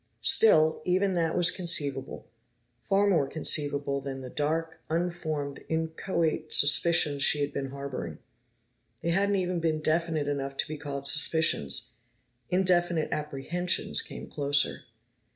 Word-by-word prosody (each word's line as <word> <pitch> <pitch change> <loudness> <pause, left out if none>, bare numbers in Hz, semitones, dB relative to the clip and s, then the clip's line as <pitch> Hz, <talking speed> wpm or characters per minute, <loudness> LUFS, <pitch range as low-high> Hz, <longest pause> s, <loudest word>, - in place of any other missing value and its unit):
Still, 160 -8 +4
even 185 +2 +1
that 165 -2 0
was 175 -1 +4
conceivable, 145 -7 -2 0.6
far 200 +1 +1
more 165 -9 +2
conceivable 145 -2 0
than 135 -1 -6
the 130 -1 -9
dark, 160 +2 -2
unformed, 160 -4 -3
inchoate 160 0 -2
suspicions 145 0 +4
she 145 +2 +4
had 145 0 -2
been 135 -1 -4
harboring. 140 -1 -6 0.9
They 170 - 0
hadn't 200 +3 +1
even 180 -2 -1
been 160 -2 -1
definite 155 -1 0
enough 140 -1 -3
to - - -1
be 155 - -6
called 140 -1 -5
suspicions; 145 - +3 0.6
indefinite 175 -3 +1
apprehensions 155 +4 -1
came - - -8
closer. 145 0 0
155 Hz, 125 wpm, -28 LUFS, 140-170 Hz, 0.9 s, Still